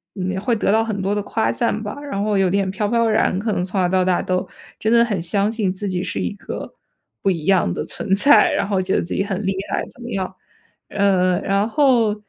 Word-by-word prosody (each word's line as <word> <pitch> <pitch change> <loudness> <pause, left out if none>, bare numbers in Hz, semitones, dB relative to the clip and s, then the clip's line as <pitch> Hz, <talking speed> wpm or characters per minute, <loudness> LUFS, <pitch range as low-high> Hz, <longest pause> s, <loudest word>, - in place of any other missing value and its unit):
嗯， 190 -1 -2
会 230 +3 +1
得 210 - +1
到 220 +1 +3
很 215 -3 -3
多 195 +1 0
的 205 - -1
夸 115 - -1
赞 205 - -1
吧， 205 +2 -5
然 280 -9 -4
后 210 -2 +1
有 190 -2 +3
点 195 0 0
飘 205 +2 -1
飘 230 +1 +2
然。 215 -4 +2
可 215 +2 -1
能 180 - -1
从 190 +2 -1
小 180 - +3
到 185 0 +2
大 180 -1 +2
都 185 0 -1 0.3
真 220 - 0
的 235 0 +5
很 205 -7 -2
相 200 +5 0
信 210 -5 0
自 195 +2 -5
己 180 -1 -2
是 - - -4
一 90 -2 -1
个 - - -7 0.5
不 - - +2
一 165 -5 -2
样 190 - +3
的 - - -3
存 195 -3 -1
在， 215 +1 +5
然 - - 0
后 195 -2 0
觉 185 +1 -1
得 - - +2
自 170 - -5
己 195 - 0
很 200 0 -3
厉 195 0 0
害 - - -1
怎 - - -17
么 240 - -7
样。 190 -4 -3 0.5
呃， 185 -3 +2
然 200 +2 +1
后， 240 -6 +3
195 Hz, 270 characters per minute, -20 LUFS, 185-215 Hz, 0.5 s, 的